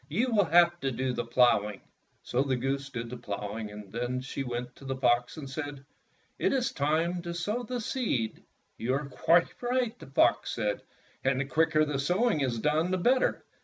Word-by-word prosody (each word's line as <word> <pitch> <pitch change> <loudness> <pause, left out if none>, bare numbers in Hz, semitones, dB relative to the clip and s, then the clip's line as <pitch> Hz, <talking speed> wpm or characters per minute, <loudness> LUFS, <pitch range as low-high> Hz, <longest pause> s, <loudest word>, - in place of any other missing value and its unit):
You 230 - 0
will 205 -3 +4
have 175 +1 +5
to 135 -3 -1
do 130 +1 -1
the 120 -1 -3
ploughing." 105 -5 +3 0.4
So 125 - 0
the 135 -1 +1
goose 135 +2 -2
did 120 -3 -5
the 125 - -5
ploughing, 105 0 -5
and 105 -1 -10
then 120 +2 -2
she 135 +1 -5
went 125 -1 -4
to 135 - -13
the 135 0 -2
fox 120 0 +1
and 145 -3 -6
said, 145 0 -6 0.5
"It - - +2
is 265 -1 +1
time 165 +5 0
to 170 0 -5
sow 210 +8 -1
the 245 +1 -4
seed." 210 - -2 0.4
"You 125 +4 0
are 145 +2 -2
quite 165 +5 +3
right," 245 -2 0
the - - -11
fox 135 - +2
said, 105 -1 -1 0.4
"and 130 0 +2
the 135 - 0
quicker 155 +2 +3
the 145 -2 -2
sowing 180 - +2
is 125 -4 0
done 150 +8 +1
the 185 - +1
better. 250 +8 +2
140 Hz, 200 wpm, -29 LUFS, 125-175 Hz, 0.5 s, have